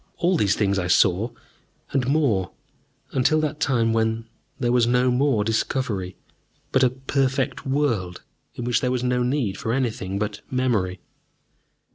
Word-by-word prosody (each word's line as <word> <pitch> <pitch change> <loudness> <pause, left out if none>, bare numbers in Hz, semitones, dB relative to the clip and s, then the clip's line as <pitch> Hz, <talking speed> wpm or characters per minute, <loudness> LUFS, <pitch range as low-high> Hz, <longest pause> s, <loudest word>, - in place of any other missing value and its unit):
All 180 +2 +2
these 100 - +2
things 100 -2 +1
I 90 - -2
saw, 95 +5 +3 0.6
and 130 -3 0
more, 130 - +1 0.6
until 135 +4 +2
that 155 0 -2
time 115 -6 +2
when 110 0 0 0.3
there 120 - +1
was 120 -1 +3
no 125 +1 +3
more 125 -4 +2
discovery, 110 -4 -2 0.5
but 130 - +3
a 130 - +5
Perfect 135 +1 -1
World 120 -11 -1 0.3
in 120 - -5
which 120 0 +1
there 125 - 0
was 125 -1 -1
no 125 0 +1
need 125 -6 -1
for 115 - -2
anything 110 -7 -1
but 105 0 -3
memory. 110 -8 0
120 Hz, 150 wpm, -23 LUFS, 105-130 Hz, 0.6 s, a